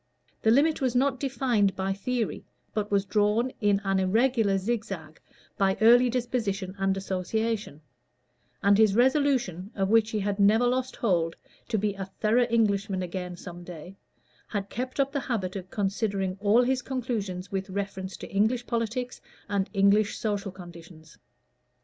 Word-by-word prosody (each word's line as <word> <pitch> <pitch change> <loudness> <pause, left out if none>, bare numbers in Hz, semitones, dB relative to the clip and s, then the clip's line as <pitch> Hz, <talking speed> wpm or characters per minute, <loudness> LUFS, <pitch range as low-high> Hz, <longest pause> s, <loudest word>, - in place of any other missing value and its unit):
The 220 - +3
limit 290 +7 +3
was 255 -2 0
not 260 0 +2
defined 245 -8 +1
by 195 0 -1
theory, 230 +3 -2 0.3
but 210 -1 -2
was 200 -1 +1
drawn 210 +5 +1
in 205 -2 +3
an 195 -1 +1
irregular 220 +1 +2
zigzag 195 -7 -4 0.4
by 195 -1 +2
early 240 +3 +6
disposition 225 -6 -2
and 195 0 +1
association; 195 -1 -2 0.8
and 200 +1 +5
his 215 -3 +5
resolution, 250 - +2
of 195 -1 0
which 225 0 +4
he 215 - -2
had 200 +1 -2
never 215 +4 +5
lost 255 +1 0
hold, 170 -7 0 0.3
to 220 - 0
be 205 0 0
a 195 -1 -5
thorough 235 +3 +3
Englishman 200 -4 +1
again 180 0 -5
some 175 0 -9
day, 175 +1 -10 0.5
had 200 -2 -4
kept 255 +4 -4
up 275 0 +2
the 280 - -1
habit 210 -8 -3
of 185 -1 -6
considering 195 -2 -1
all 215 +4 +4
his 255 +1 +1
conclusions 220 -8 -4
with 195 0 -3
reference 190 -1 -4
to - - -9
English 225 +5 +1
politics 235 +2 -3 0.3
and 200 -1 -1
English 200 +1 +3
social 205 -3 -2
conditions. 170 -3 -13
205 Hz, 155 wpm, -27 LUFS, 190-235 Hz, 0.8 s, early